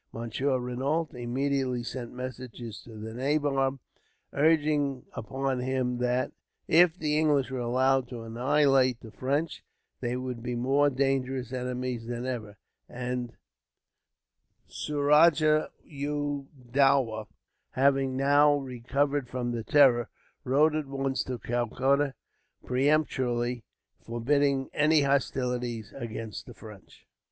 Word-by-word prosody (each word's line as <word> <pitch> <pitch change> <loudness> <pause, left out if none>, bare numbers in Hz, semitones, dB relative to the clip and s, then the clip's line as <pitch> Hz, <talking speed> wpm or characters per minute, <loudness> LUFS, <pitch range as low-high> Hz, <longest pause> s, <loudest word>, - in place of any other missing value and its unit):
Monsieur 125 +4 -1
Renault 135 +6 -1
immediately 130 0 -1
sent 120 -1 -6
messengers 125 -3 -7
to 115 - -13
the 110 +1 -7
nabob, 135 +1 0 0.6
urging 145 -3 +2
upon 135 +3 -2
him 125 -1 -1
that, 125 +1 0 0.4
if 175 +1 +5
the 150 -3 0
English 145 -4 +2
were 130 - -3
allowed 130 +2 +2
to 120 -2 -7
annihilate 130 +1 +2
the 110 - -11
French, 145 +7 -2 0.4
they 125 0 -2
would 125 -2 -5
be 125 +1 -3
more 135 +4 +3
dangerous 130 -2 -1
enemies 125 -2 -3
than 120 +1 -4
ever; 110 -5 -5 0.3
and 125 -1 -4 1.3
Suraja 155 +1 +3
u 145 -1 -3 0.2
Dowlah, 130 -5 +3 0.5
having 135 -1 +2
now 145 +2 +5
recovered 140 +1 -1
from 120 -1 -2
his 115 -2 -4
terror, 130 -5 +5 0.3
wrote 145 +4 +3
at 155 -2 -2
once 135 -1 -1
to 125 -1 -4
Calcutta, 130 +4 0 0.5
peremptorily 125 -4 0 0.4
forbidding 135 +3 +1
any 150 +1 +4
hostilities 125 -4 -1
against 115 -2 -6
the - - -11
French. 105 -4 -14
130 Hz, 110 wpm, -28 LUFS, 120-140 Hz, 1.3 s, if